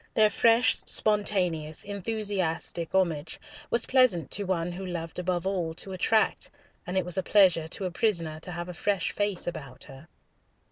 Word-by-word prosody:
Their 215 Hz, -1 st, +5 dB
fresh, 230 Hz, +1 st, +4 dB
spontaneous, 180 Hz, -7 st, +1 dB
enthusiastic 200 Hz, -5 st, -3 dB
homage 165 Hz, -5 st, 0 dB, 0.3 s
was 235 Hz, -, +1 dB
pleasant 245 Hz, -, +3 dB
to 205 Hz, -, -2 dB
one 175 Hz, -2 st, -1 dB
who 185 Hz, +2 st, -7 dB
loved 170 Hz, -2 st, -5 dB
above 180 Hz, 0 st, -1 dB
all 175 Hz, -4 st, -2 dB
to 190 Hz, +3 st, -2 dB
attract, 215 Hz, +4 st, +1 dB, 0.4 s
and 180 Hz, +1 st, -2 dB
it 185 Hz, -, +1 dB
was 180 Hz, +1 st, 0 dB
a -, -, +1 dB
pleasure 180 Hz, -5 st, +4 dB
to 190 Hz, +4 st, -5 dB
a 180 Hz, -, -2 dB
prisoner 170 Hz, -6 st, 0 dB
to 180 Hz, -, -7 dB
have 175 Hz, 0 st, -5 dB
a 180 Hz, -, -6 dB
fresh 195 Hz, +1 st, -1 dB
face 205 Hz, -3 st, -2 dB
about 140 Hz, -7 st, -6 dB
her. 135 Hz, +3 st, -13 dB
180 Hz, 170 wpm, -27 LUFS, 165-205 Hz, 0.4 s, Their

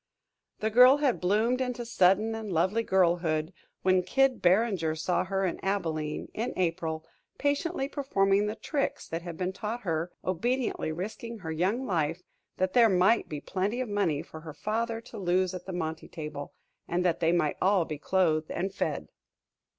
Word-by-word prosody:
The 220 Hz, +1 st, 0 dB
girl 250 Hz, +4 st, +8 dB
had 285 Hz, -5 st, +1 dB
bloomed 220 Hz, +7 st, +2 dB
into 250 Hz, -2 st, -2 dB
sudden 210 Hz, 0 st, +3 dB
and 220 Hz, -2 st, -5 dB
lovely 185 Hz, +7 st, +2 dB
girlhood 175 Hz, -5 st, +1 dB, 0.3 s
when 185 Hz, 0 st, +4 dB
Kid 270 Hz, +7 st, +2 dB
Barringer 180 Hz, -4 st, +2 dB
saw 175 Hz, +3 st, 0 dB
her 195 Hz, 0 st, 0 dB
at 180 Hz, -, -2 dB
Abilene, 160 Hz, -6 st, -2 dB
in 230 Hz, +3 st, -2 dB
April, 165 Hz, -3 st, -1 dB, 0.3 s
patiently 285 Hz, +1 st, 0 dB
performing 205 Hz, -9 st, +1 dB
the 210 Hz, -, -3 dB
tricks 280 Hz, +3 st, -2 dB
that 165 Hz, +1 st, -4 dB
had 170 Hz, -2 st, -7 dB
been 185 Hz, 0 st, -2 dB
taught 220 Hz, +4 st, -4 dB
her, 165 Hz, -2 st, -2 dB
obediently 235 Hz, +1 st, -1 dB
risking 220 Hz, +7 st, -5 dB
her 170 Hz, -6 st, -6 dB
young 190 Hz, +11 st, 0 dB
life 165 Hz, -2 st, -1 dB, 0.3 s
that 185 Hz, 0 st, 0 dB
there 235 Hz, -2 st, +6 dB
might 190 Hz, +4 st, +3 dB
be 150 Hz, -2 st, -5 dB
plenty 200 Hz, +6 st, -2 dB
of 255 Hz, -3 st, -2 dB
money 185 Hz, -8 st, 0 dB
for 160 Hz, -, -10 dB
her 155 Hz, -2 st, -9 dB
father 225 Hz, +4 st, -2 dB
to 230 Hz, -2 st, -10 dB
lose 185 Hz, 0 st, +1 dB
at 180 Hz, 0 st, -7 dB
the -, -, -4 dB
monte 160 Hz, -2 st, -4 dB
table, 150 Hz, -3 st, -7 dB, 0.4 s
and 180 Hz, +1 st, 0 dB
that 170 Hz, -2 st, +2 dB
they 165 Hz, -1 st, +3 dB
might 165 Hz, -4 st, +1 dB
all 190 Hz, -3 st, +3 dB
be 155 Hz, -2 st, -6 dB
clothed 160 Hz, -3 st, +1 dB
and 190 Hz, +2 st, -2 dB
fed. -, -, -2 dB
185 Hz, 175 wpm, -29 LUFS, 165-225 Hz, 0.4 s, girl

